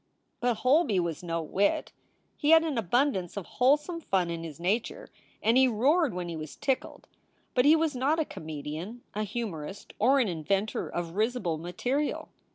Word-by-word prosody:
But 245 Hz, -1 st, +1 dB
Holby 255 Hz, -, +3 dB
was 170 Hz, -3 st, -2 dB
no 165 Hz, -2 st, -2 dB
wit. 195 Hz, +6 st, 0 dB, 0.4 s
He 295 Hz, -, -1 dB
had 325 Hz, 0 st, +8 dB
an 315 Hz, -4 st, -2 dB
abundance 215 Hz, -3 st, 0 dB
of 195 Hz, -, -4 dB
whole 260 Hz, +4 st, +4 dB
some 335 Hz, +3 st, -7 dB
fun 185 Hz, -, 0 dB
in 165 Hz, 0 st, -4 dB
his 160 Hz, -2 st, -8 dB
nature, 220 Hz, -, -2 dB, 0.3 s
and 230 Hz, +3 st, +4 dB
he 260 Hz, 0 st, +6 dB
roared 265 Hz, -, +2 dB
when 180 Hz, -1 st, -3 dB
he 170 Hz, -, -5 dB
was 155 Hz, -1 st, -7 dB
tickled, 265 Hz, -2 st, -2 dB, 0.5 s
but 250 Hz, -, +3 dB
he 305 Hz, +2 st, +7 dB
was 320 Hz, -3 st, 0 dB
not 275 Hz, +5 st, +1 dB
a 320 Hz, -, +1 dB
comedian, 160 Hz, -, -7 dB
a 210 Hz, -, -2 dB
humorist, 200 Hz, -5 st, -5 dB
or 265 Hz, +6 st, +4 dB
an 245 Hz, -, +2 dB
inventor 195 Hz, +5 st, -1 dB
of 170 Hz, -1 st, -4 dB
risible 210 Hz, -7 st, 0 dB
material. 245 Hz, -, -2 dB
215 Hz, 175 wpm, -28 LUFS, 175-270 Hz, 0.5 s, had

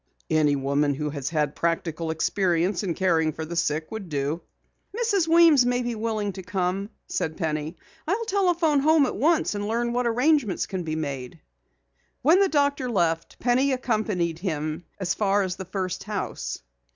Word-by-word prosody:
"Any 150 Hz, -2 st, +3 dB
woman 140 Hz, +1 st, +1 dB
who 150 Hz, +1 st, -3 dB
has 140 Hz, -2 st, -3 dB
had 150 Hz, -3 st, 0 dB
practical 165 Hz, -1 st, -1 dB
experience 175 Hz, +2 st, +1 dB
in 180 Hz, -5 st, -2 dB
caring 165 Hz, -4 st, +2 dB
for 160 Hz, -, -5 dB
the 170 Hz, +2 st, -6 dB
sick 155 Hz, -2 st, -1 dB
would 220 Hz, -5 st, -6 dB
do." 145 Hz, +3 st, -2 dB, 0.6 s
"Mrs. 410 Hz, -8 st, +1 dB
Weems 330 Hz, -5 st, +6 dB
may 245 Hz, 0 st, +1 dB
be 240 Hz, 0 st, -2 dB
willing 215 Hz, -2 st, -2 dB
to 190 Hz, -, -7 dB
come," 185 Hz, +2 st, -2 dB, 0.2 s
said 160 Hz, 0 st, -3 dB
Penny. 155 Hz, -1 st, -2 dB, 0.3 s
"I'll 420 Hz, +7 st, 0 dB
telephone 350 Hz, -8 st, +2 dB
home 310 Hz, +1 st, +4 dB
at -, -, -3 dB
once 320 Hz, 0 st, +2 dB
and 205 Hz, 0 st, -3 dB
learn 235 Hz, +2 st, -1 dB
what 245 Hz, 0 st, +1 dB
arrangements 250 Hz, -, +2 dB
can 190 Hz, -2 st, -4 dB
be 155 Hz, -2 st, -3 dB
made." 140 Hz, -5 st, -5 dB, 0.8 s
When 325 Hz, +8 st, +6 dB
the 395 Hz, -1 st, +4 dB
doctor 285 Hz, -4 st, +1 dB
left, 165 Hz, -6 st, 0 dB
Penny 260 Hz, +3 st, +2 dB
accompanied 210 Hz, -9 st, -1 dB
him 155 Hz, -2 st, -3 dB
as 185 Hz, -2 st, 0 dB
far 200 Hz, -1 st, +2 dB
as 185 Hz, -1 st, -3 dB
the 190 Hz, -, -6 dB
first 185 Hz, -1 st, -4 dB
house. 205 Hz, -, -4 dB
190 Hz, 170 wpm, -25 LUFS, 160-250 Hz, 0.8 s, Weems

